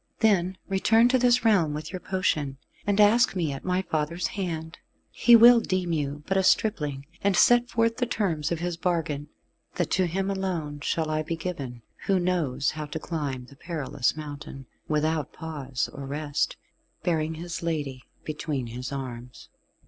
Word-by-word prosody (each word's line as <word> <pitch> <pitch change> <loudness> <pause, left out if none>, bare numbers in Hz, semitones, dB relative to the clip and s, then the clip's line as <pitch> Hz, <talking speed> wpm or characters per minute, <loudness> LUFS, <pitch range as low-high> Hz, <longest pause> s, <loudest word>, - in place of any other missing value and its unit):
Then 190 -4 +3
return 225 +5 +4
to 260 0 +3
this 245 -1 +3
realm 175 -9 +3
with 155 +4 -6
your 185 - -3
potion, 155 -8 -1 0.3
and 205 0 +2
ask 215 +2 +5
me 165 -5 0
at 135 - -7
my 185 +1 0
father's 165 +1 -2
hand. 170 -7 -4 0.3
He 240 - +6
will 235 +1 +9
deem 185 -5 -1
you 145 -1 -2
but 190 - 0
a - - +4
stripling, 150 -9 +1 0.2
and 200 -2 +3
set 240 0 +5
forth 230 -1 +1
the 245 - 0
terms 170 -10 -1
of 170 - 0
his 175 -1 -2
bargain, 165 -5 -1 0.5
that 175 -4 -1
to 185 -1 +2
him 190 +3 -1
alone 175 -7 -3
shall 155 +2 -1
I 155 0 +1
be 155 +2 -3
given 140 -9 -5 0.2
who 195 -2 +3
knows 155 -7 0
how 155 -1 -5
to 150 - -5
climb 145 -6 -4
the 140 - -16
perilous 150 -4 -2
mountain, 145 -3 -8 0.2
without 155 -1 0
pause 140 -6 -3
or 140 -1 -7
rest, 145 +1 -1 0.5
bearing 160 -2 0
his 170 +1 -5
lady 145 -6 -2 0.2
between 150 -4 -3
his 125 +2 -5
arms." 125 -3 -7
165 Hz, 170 wpm, -26 LUFS, 145-190 Hz, 0.5 s, will